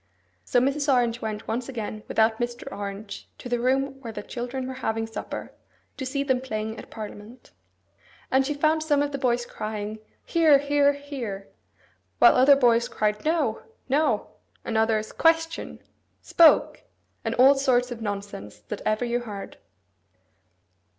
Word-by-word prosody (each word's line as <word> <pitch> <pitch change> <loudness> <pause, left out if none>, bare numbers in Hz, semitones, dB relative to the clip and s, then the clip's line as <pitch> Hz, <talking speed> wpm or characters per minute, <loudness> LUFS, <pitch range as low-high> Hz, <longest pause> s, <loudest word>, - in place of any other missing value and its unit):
So 245 - +2
Mrs. 280 +3 +1
Orange 240 -2 +1
went 215 -1 -5
once 240 +3 -3
again 215 -4 -5
without 220 0 +2
Mr. 240 0 -3
Orange 200 0 -7
to - - -8
the 245 -1 -1
room 270 +2 0
where 235 -4 -6
the 215 - -7
children 250 +3 -5
were 260 - -5
having 225 0 -1
supper, 225 - -7 0.4
to 265 - -4
see 275 +2 -1
them 260 -3 +1
playing 220 -3 -4
at - - -11
parliament. 215 +2 -10 0.8
And 265 +1 +4
she 290 +2 -2
found 310 +2 +2
some 295 -2 +2
of 290 - -2
the 275 - -4
boys 245 -2 +1
crying, 215 -1 -5 0.3
'Hear, 320 -4 +5
hear, 285 0 +3
hear!' 255 -9 -6 0.7
while - - +7
other 265 +3 +6
boys 240 -3 +3
cried 210 0 -1
'No, 320 +1 0 0.3
no!' 295 +4 +2 0.4
and 225 - -3
others, 220 -1 +1
'Question!' 325 0 0 0.4
'Spoke!' 330 -2 +4 0.4
and - - -2
all 265 +3 +7
sorts 255 -3 +1
of 235 -1 -6
nonsense 200 - -5
that 210 - -5
ever 215 +3 0
you 240 0 0
heard. 210 -5 -8
245 Hz, 155 wpm, -25 LUFS, 220-275 Hz, 0.8 s, while